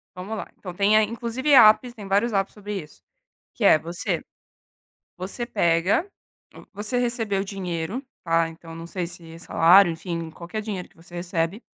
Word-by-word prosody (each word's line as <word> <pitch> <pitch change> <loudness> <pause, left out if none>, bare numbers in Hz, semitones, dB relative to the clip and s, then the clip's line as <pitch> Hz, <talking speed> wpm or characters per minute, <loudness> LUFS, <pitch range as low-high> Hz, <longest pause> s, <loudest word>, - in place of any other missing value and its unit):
Vamos 195 +5 -5
lá. - - -5
Então, 180 -3 -8
tem 200 +3 +3
a 215 - +6
inclusive 235 +5 -2
apps, 235 0 +7
tem 210 -4 -9
vários 205 +4 +2
apps 195 -1 0
sobre 205 -2 -5
isso, 150 - -16 0.5
que - - -4
é 155 - +7
você 170 +3 -2 1.0
você 195 +7 -5
pega 185 - +2 0.7
você 210 +5 -2
recebeu 230 -5 0
dinheiro, 190 - -4 0.2
tá? 165 -1 +2
Então, 165 0 -11
não 165 0 -8
sei 175 0 -3
se 170 -2 -11
é - - -10
salário, 175 +2 +5
enfim, 165 0 -5
qualquer 175 +6 -6
dinheiro 205 -4 -5
que - - -29
você 170 +1 -19
recebe, 175 +2 -2
195 Hz, 170 wpm, -24 LUFS, 170-215 Hz, 1.0 s, apps